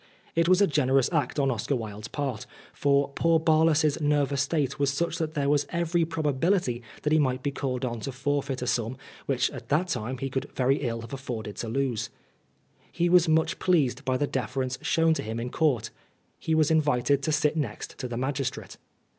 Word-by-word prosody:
It 165 Hz, +1 st, +3 dB
was 185 Hz, +2 st, +5 dB
a -, -, +7 dB
generous 135 Hz, -4 st, +2 dB
act 155 Hz, -2 st, 0 dB
on 135 Hz, -2 st, +2 dB
Oscar 120 Hz, +4 st, -1 dB
Wilde's 110 Hz, -2 st, -6 dB
part, 135 Hz, -4 st, -4 dB, 0.3 s
for 140 Hz, 0 st, +2 dB
poor 165 Hz, +3 st, +2 dB
Barlas' 160 Hz, -1 st, +3 dB
s 150 Hz, +1 st, 0 dB
nervous 145 Hz, -2 st, +1 dB
state 140 Hz, -2 st, -1 dB
was 140 Hz, -1 st, +2 dB
such 170 Hz, +5 st, -2 dB
that 160 Hz, 0 st, -3 dB
there 140 Hz, -1 st, 0 dB
was 145 Hz, 0 st, +2 dB
every 170 Hz, 0 st, +1 dB
probability 155 Hz, -3 st, 0 dB, 0.2 s
that 150 Hz, -, +1 dB
he 155 Hz, -, +5 dB
might 130 Hz, -3 st, 0 dB
be 145 Hz, -, 0 dB
called 130 Hz, -2 st, -2 dB
on 120 Hz, -2 st, -3 dB
to 110 Hz, -, -5 dB
105 130 Hz, -1 st, -9 dB
Oscar 145 Hz, -, +2 dB
Wilde 145 Hz, -1 st, 0 dB
forfeit 130 Hz, -3 st, -3 dB
a -, -, -2 dB
sum 120 Hz, 0 st, -1 dB, 0.3 s
which -, -, +1 dB
at -, -, -10 dB
that 170 Hz, +5 st, +1 dB
time 125 Hz, 0 st, -2 dB
he 135 Hz, +1 st, -4 dB
could 135 Hz, -, -3 dB
very 135 Hz, +2 st, +2 dB
ill 115 Hz, -4 st, -3 dB
have 115 Hz, +2 st, -10 dB
afforded 115 Hz, -6 st, -5 dB
to 115 Hz, -, -4 dB
lose. 130 Hz, -2 st, -1 dB, 0.8 s
He 175 Hz, 0 st, +1 dB
was 175 Hz, -1 st, +5 dB
much 160 Hz, 0 st, +2 dB
pleased 145 Hz, -7 st, +2 dB
by 130 Hz, -1 st, 0 dB
the 145 Hz, -, +1 dB
deference 130 Hz, -1 st, -2 dB
shown 165 Hz, 0 st, +3 dB
to -, -, -2 dB
him 110 Hz, +2 st, -4 dB
in 120 Hz, +1 st, -4 dB
Court. 130 Hz, -8 st, +1 dB, 0.5 s
He 160 Hz, -, 0 dB
was 155 Hz, 0 st, +3 dB
invited 145 Hz, -3 st, +2 dB
to 155 Hz, -, -1 dB
sit 150 Hz, 0 st, +2 dB
next 140 Hz, -9 st, -4 dB
to 130 Hz, -, -3 dB
the 120 Hz, -1 st, -5 dB
magistrate. 135 Hz, 0 st, -3 dB
140 Hz, 215 wpm, -27 LUFS, 125-155 Hz, 0.8 s, a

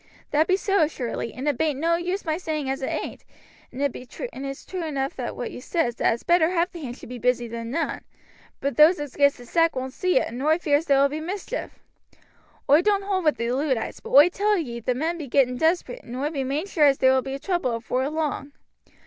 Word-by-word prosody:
"That 305 Hz, +2 st, +3 dB
be 375 Hz, -, +3 dB
so, 390 Hz, -5 st, +2 dB
surely, 240 Hz, -5 st, -4 dB
and 260 Hz, +6 st, -6 dB
it 285 Hz, -5 st, 0 dB
bain't 300 Hz, -4 st, 0 dB
no 335 Hz, +2 st, +2 dB
use 360 Hz, +3 st, -3 dB
my 315 Hz, -1 st, 0 dB
saying 310 Hz, -5 st, -3 dB
as 270 Hz, -, -4 dB
it 265 Hz, -, -2 dB
ain't, -, -, -4 dB, 0.5 s
and 270 Hz, -, -4 dB, 0.6 s
it's 275 Hz, 0 st, -6 dB
true 370 Hz, -2 st, -5 dB
enough 275 Hz, -4 st, -3 dB
what 245 Hz, -1 st, -4 dB
you -, -, -8 dB
says, 260 Hz, -2 st, 0 dB
that -, -, +3 dB
it's 235 Hz, -, -13 dB
better 345 Hz, -2 st, +4 dB
half 350 Hz, 0 st, 0 dB
the 345 Hz, -, -9 dB
hands 250 Hz, -3 st, -6 dB
should -, -, -12 dB
be 250 Hz, -1 st, -7 dB
busy 245 Hz, 0 st, +1 dB
than 230 Hz, 0 st, -6 dB
none; 325 Hz, +7 st, -2 dB, 0.6 s
but 280 Hz, 0 st, -2 dB
those 310 Hz, +3 st, +7 dB
as 290 Hz, -3 st, -6 dB
gets 285 Hz, -1 st, +4 dB
the 245 Hz, -, -12 dB
sack 330 Hz, +6 st, +2 dB
won't 260 Hz, 0 st, -4 dB
see 365 Hz, -4 st, +1 dB
it, -, -, +2 dB
and 240 Hz, +3 st, -6 dB
oi 310 Hz, +3 st, +3 dB
fears 300 Hz, -2 st, +1 dB
there 275 Hz, -3 st, +4 dB
will 280 Hz, -, +4 dB
be 300 Hz, +2 st, -4 dB
mischief. 390 Hz, +8 st, -5 dB, 0.9 s
Oi 295 Hz, +4 st, +6 dB
don't 400 Hz, +1 st, +2 dB
hold 385 Hz, -3 st, -1 dB
with 305 Hz, -, +3 dB
the 235 Hz, +1 st, -1 dB
Luddites, 260 Hz, -2 st, -1 dB
but -, -, -10 dB
oi 290 Hz, +5 st, +8 dB
tell 410 Hz, +3 st, +1 dB
ye 240 Hz, -9 st, -4 dB
the 245 Hz, +2 st, -1 dB
men 330 Hz, +6 st, -2 dB
be 300 Hz, -, -5 dB
getting 250 Hz, -1 st, +2 dB
desperate, 345 Hz, -, 0 dB
and 240 Hz, -, -8 dB
oi 285 Hz, +4 st, -2 dB
be 275 Hz, -4 st, -2 dB
main 280 Hz, +6 st, -2 dB
sure 330 Hz, -6 st, +2 dB
as 275 Hz, -1 st, +3 dB
there 260 Hz, 0 st, +4 dB
will 260 Hz, -, +3 dB
be 270 Hz, +1 st, -5 dB
trouble 310 Hz, -7 st, -1 dB
afore 255 Hz, +4 st, -1 dB
long. 300 Hz, -2 st, -3 dB
290 Hz, 235 wpm, -24 LUFS, 260-335 Hz, 0.9 s, oi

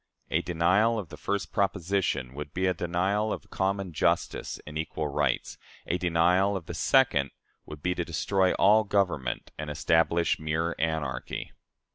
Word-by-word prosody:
A 80 Hz, -, +2 dB
denial 90 Hz, +7 st, +2 dB
of 100 Hz, -7 st, -5 dB
the -, -, -8 dB
first 100 Hz, -1 st, -3 dB
proposition 95 Hz, -9 st, 0 dB
would 75 Hz, +1 st, -7 dB
be 95 Hz, +1 st, +1 dB
a 90 Hz, -, +3 dB
denial 95 Hz, +5 st, 0 dB
of -, -, -6 dB
common 95 Hz, -2 st, -1 dB
justice -, -, 0 dB
and 75 Hz, -, -9 dB
equal 80 Hz, -1 st, -2 dB
rights; 70 Hz, -2 st, -1 dB, 0.3 s
a 90 Hz, -, -1 dB
denial 90 Hz, +3 st, +3 dB
of 85 Hz, -, -9 dB
the 85 Hz, -, -6 dB
second 80 Hz, -, +3 dB, 0.4 s
would 75 Hz, -1 st, -10 dB
be 90 Hz, -, +1 dB
to 90 Hz, -, -2 dB
destroy 95 Hz, +3 st, +1 dB
all 105 Hz, +3 st, +5 dB
government 90 Hz, -, -1 dB
and 75 Hz, -1 st, -4 dB
establish 80 Hz, +3 st, +2 dB
mere 80 Hz, +2 st, -1 dB
anarchy. 80 Hz, -6 st, -2 dB
85 Hz, 155 wpm, -28 LUFS, 80-95 Hz, 0.4 s, all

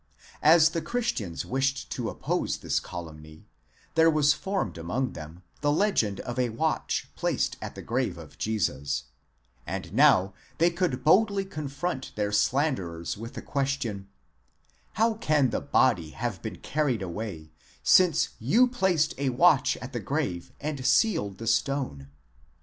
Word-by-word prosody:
As 160 Hz, +1 st, +7 dB
the 165 Hz, 0 st, -3 dB
Christians 160 Hz, -, -2 dB
wished 135 Hz, +1 st, -1 dB
to 120 Hz, -3 st, -2 dB
oppose -, -, -2 dB
this -, -, -1 dB
calumny, 80 Hz, -2 st, -10 dB, 0.5 s
there 165 Hz, 0 st, +5 dB
was 150 Hz, -2 st, +4 dB
formed 190 Hz, -, -3 dB
among 125 Hz, +11 st, -2 dB
them 80 Hz, +4 st, -10 dB, 0.2 s
the 145 Hz, -1 st, +2 dB
legend 145 Hz, -, +1 dB
of 120 Hz, +1 st, -5 dB
a 125 Hz, -1 st, +1 dB
watch 155 Hz, +8 st, -1 dB
placed -, -, 0 dB
at -, -, -6 dB
the -, -, -8 dB
grave -, -, -1 dB
of -, -, -12 dB
Jesus, 100 Hz, -10 st, -1 dB, 0.6 s
and -, -, -5 dB
now 95 Hz, +1 st, +5 dB, 0.2 s
they 170 Hz, +2 st, +4 dB
could 170 Hz, -8 st, -1 dB
boldly 195 Hz, +5 st, +4 dB
confront 145 Hz, -3 st, -4 dB
their 105 Hz, -1 st, -1 dB
slanderers 105 Hz, -, 0 dB
with 115 Hz, +3 st, -9 dB
the -, -, -6 dB
question: 135 Hz, -8 st, -2 dB, 0.9 s
hhow 225 Hz, +2 st, +3 dB
can 150 Hz, -, +2 dB
the -, -, -1 dB
body 115 Hz, -, +2 dB
have 115 Hz, +4 st, -4 dB
been 110 Hz, -, -5 dB
carried 140 Hz, -8 st, -1 dB
away, 85 Hz, -4 st, -6 dB, 0.3 s
since 180 Hz, -4 st, +5 dB
you 220 Hz, -, +4 dB
placed 190 Hz, -10 st, +1 dB
a 140 Hz, -1 st, +1 dB
watch 135 Hz, 0 st, +4 dB
at 130 Hz, +1 st, -9 dB
the 120 Hz, -, -2 dB
'grave 100 Hz, -, -3 dB
and 145 Hz, -3 st, -4 dB
sealed 135 Hz, -, +2 dB
the 115 Hz, -, -7 dB
stone? 115 Hz, -, -1 dB
130 Hz, 145 wpm, -27 LUFS, 100-155 Hz, 0.9 s, As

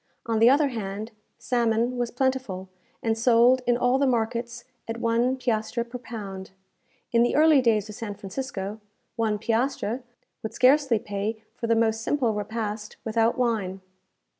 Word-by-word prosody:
On 225 Hz, -1 st, 0 dB
the 230 Hz, +2 st, +7 dB
other 285 Hz, +2 st, +4 dB
hand, 215 Hz, -1 st, -5 dB, 0.3 s
salmon 235 Hz, 0 st, +1 dB
was 240 Hz, -1 st, -1 dB
plentiful, 250 Hz, -8 st, -2 dB, 0.3 s
and 225 Hz, -1 st, +1 dB
sold 240 Hz, +2 st, +4 dB
in 240 Hz, -1 st, +3 dB
all 245 Hz, +2 st, +2 dB
the 280 Hz, -, +3 dB
markets 235 Hz, 0 st, -1 dB, 0.2 s
at 225 Hz, 0 st, -4 dB
one 235 Hz, +3 st, +1 dB
piastre 235 Hz, -1 st, -1 dB
per 245 Hz, +1 st, -8 dB
pound. 200 Hz, -6 st, -7 dB, 0.6 s
In 235 Hz, -, +4 dB
the 240 Hz, -, +2 dB
early 305 Hz, -2 st, +6 dB
days 220 Hz, -4 st, +2 dB
of 210 Hz, -, -8 dB
San 210 Hz, -1 st, -6 dB
Francisco, 205 Hz, -1 st, -5 dB, 0.4 s
one 220 Hz, -2 st, 0 dB
piastre 235 Hz, +2 st, -1 dB, 0.4 s
would 220 Hz, -, -6 dB
scarcely 265 Hz, -1 st, +4 dB
pay 210 Hz, +2 st, -4 dB
for 230 Hz, -, -4 dB
the 230 Hz, -, +3 dB
most 225 Hz, 0 st, +1 dB
simple 245 Hz, -2 st, +1 dB
repast 210 Hz, 0 st, -4 dB
without 225 Hz, +1 st, +1 dB
wine. 210 Hz, -6 st, -1 dB
230 Hz, 155 wpm, -26 LUFS, 215-245 Hz, 0.6 s, the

